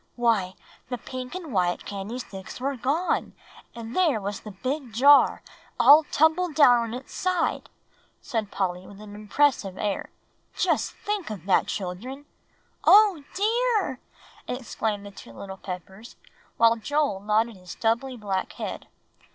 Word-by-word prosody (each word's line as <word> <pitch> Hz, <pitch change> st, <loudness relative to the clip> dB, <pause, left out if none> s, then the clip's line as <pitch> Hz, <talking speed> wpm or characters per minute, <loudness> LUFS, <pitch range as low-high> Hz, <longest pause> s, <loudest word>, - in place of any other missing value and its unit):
"Why, 220 Hz, -6 st, +1 dB, 0.3 s
the 250 Hz, -, -2 dB
pink 255 Hz, +4 st, -7 dB
and 335 Hz, -8 st, -6 dB
white 180 Hz, -2 st, 0 dB
candy 200 Hz, +4 st, -5 dB
sticks 195 Hz, -6 st, -8 dB
were 275 Hz, +2 st, -2 dB
gone, 285 Hz, +9 st, -1 dB, 0.4 s
and 230 Hz, +1 st, -7 dB
there 325 Hz, -11 st, +3 dB
was 200 Hz, 0 st, -4 dB
the 215 Hz, -, -10 dB
big 255 Hz, +6 st, -4 dB
jar 280 Hz, +5 st, +5 dB, 0.4 s
all 300 Hz, +2 st, +8 dB
tumbled 320 Hz, +2 st, +2 dB
down 250 Hz, -6 st, +7 dB
on 230 Hz, -1 st, -3 dB
its 255 Hz, +2 st, -9 dB
side!" 365 Hz, -2 st, -1 dB, 0.5 s
said 225 Hz, -5 st, -3 dB
Polly, 185 Hz, -2 st, -3 dB
with 200 Hz, 0 st, -13 dB
a 215 Hz, -, -10 dB
very 205 Hz, -, -11 dB
impressive 210 Hz, -2 st, +1 dB
air; 205 Hz, -2 st, -2 dB, 0.5 s
"just -, -, 0 dB
think 410 Hz, -, -4 dB
of 200 Hz, -6 st, -7 dB
that, 195 Hz, -, +3 dB
children!" 220 Hz, +10 st, -5 dB, 0.6 s
"Oh, 400 Hz, -7 st, +6 dB
dear!" 435 Hz, -, +1 dB, 0.5 s
exclaimed 220 Hz, -4 st, -3 dB
the 200 Hz, -, -9 dB
two 115 Hz, -11 st, -13 dB
little 190 Hz, -, -8 dB
Peppers, 190 Hz, +4 st, -9 dB, 0.4 s
while 230 Hz, 0 st, +5 dB
Joel 285 Hz, -2 st, 0 dB
nodded 215 Hz, +3 st, +1 dB
his 180 Hz, -1 st, -16 dB
stubbly 235 Hz, +6 st, -1 dB
black 195 Hz, -4 st, -3 dB
head. -, -, -6 dB
230 Hz, 145 wpm, -26 LUFS, 200-285 Hz, 0.6 s, all